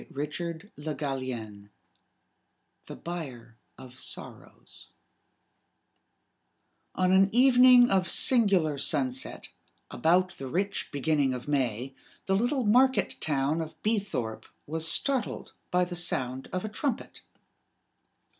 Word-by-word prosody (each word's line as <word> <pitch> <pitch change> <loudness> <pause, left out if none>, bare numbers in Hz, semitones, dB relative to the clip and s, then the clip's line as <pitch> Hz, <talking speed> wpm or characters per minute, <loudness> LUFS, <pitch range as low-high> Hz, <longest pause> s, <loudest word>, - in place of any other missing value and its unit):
THE 145 - -5 1.3
BUYER 130 -10 -8 0.2
OF 130 -1 -12
SORROWS - - -8 2.1
On 185 0 +1
an 190 +1 +5
evening 250 0 +6
of 190 -2 +1
singular 190 - +4
sunset, 130 -3 -1 0.4
about 180 +7 +1
the 135 - -6
rich 195 +8 -2
beginning 145 -2 0
of 125 - -8
May, 130 -2 -1 0.3
the 190 - +1
little 245 +6 0
market 255 +5 +3
town 150 +1 0
of 160 -1 -8
Beethorpe 195 - -2 0.2
was 160 +2 0
startled 265 0 -1 0.2
by 180 0 +2
the 175 0 -7
sound 130 -7 -2
of 185 +3 -3
a - - -4
trumpet. 245 +3 -4
160 Hz, 100 wpm, -28 LUFS, 135-200 Hz, 2.1 s, evening